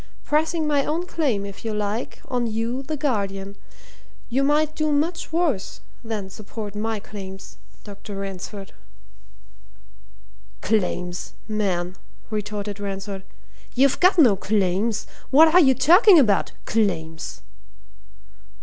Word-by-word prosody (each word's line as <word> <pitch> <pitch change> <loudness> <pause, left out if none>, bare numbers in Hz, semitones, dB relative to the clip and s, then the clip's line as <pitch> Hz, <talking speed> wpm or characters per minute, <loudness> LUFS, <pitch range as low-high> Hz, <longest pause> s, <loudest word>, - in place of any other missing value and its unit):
Pressing 315 +2 +1
my 290 -2 +2
own 325 +5 -1
claim, 265 - -1
if 200 -1 -9
you 220 -2 -2
like, 210 +3 -3
on 245 -2 -1
you, 230 +4 -2
the 305 +3 -4
guardian. 200 -7 -2 0.7
You 255 +3 +1
might 300 +2 +2
do 310 -1 0
much 315 +4 -1
worse 320 - 0 0.2
than 210 -4 -4
support 210 0 -7
my 220 +1 -2
claims, 190 - -9 0.3
Dr. 205 0 -9
Ransford." 195 0 -6 1.9
"Claims, 180 -4 -1
man!" 190 -4 -1 0.3
retorted 210 -1 -4
Ransford. 195 -1 -5 0.5
"You've 275 +2 +3
got 365 +1 +5
no 250 - +6
claims! 200 +2 0 0.2
What 315 +4 +7
are 360 - +8
you 265 -6 +5
talking 355 - +7
about? 215 -10 +3
Claims!" 165 -7 -1
215 Hz, 115 wpm, -23 LUFS, 195-285 Hz, 1.9 s, are